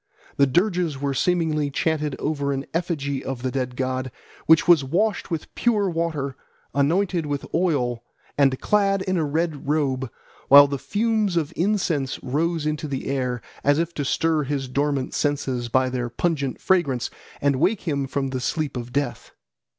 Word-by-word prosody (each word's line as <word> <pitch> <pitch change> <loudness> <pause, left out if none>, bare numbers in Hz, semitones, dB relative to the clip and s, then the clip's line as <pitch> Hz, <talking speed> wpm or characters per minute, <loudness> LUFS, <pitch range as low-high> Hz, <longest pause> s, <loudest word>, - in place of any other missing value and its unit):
The 140 - +5
dirges 175 -1 +1
were 140 0 -1
seemingly 155 -1 +1
chanted 150 -1 -1
over 145 -2 -1
an 135 0 -2
effigy 145 -5 -2
of 135 -2 -5
the 130 - -1
dead 125 -1 -2
god, 130 0 -2 0.4
which 160 0 +6
was 170 -5 +6
washed 195 +10 0
with 165 -3 -4
pure 215 -4 +1
water, 160 -5 -2 0.4
anointed 170 +4 +1
with 145 -1 -3
oil, 125 -9 0 0.3
and 135 -2 +3
clad 195 -2 +2
in 185 0 -1
a 165 - +1
red 155 -1 -2
robe, 135 -4 0 0.4
while 140 +1 +10
the 140 -1 -3
fumes 210 - 0
of 155 -3 -1
incense 170 -8 0
rose 160 +4 -1
into 155 +1 -2
the 135 -2 -4
air, 125 -3 -2 0.2
as 145 +1 +4
if 170 +1 -1
to 145 - -2
stir 160 +3 +1
his 140 -1 -2
dormant 140 0 -1
senses 135 -5 -1
by 130 +2 +3
their 125 -1 -2
pungent 140 +1 -1
fragrance 145 -10 +1 0.3
and 140 -2 +2
wake 185 +8 +2
him 140 -5 -1
from 135 0 -2
the 130 - -2
sleep 150 +2 -2
of 120 0 -5
death. 140 +2 -3
145 Hz, 165 wpm, -23 LUFS, 135-170 Hz, 0.4 s, while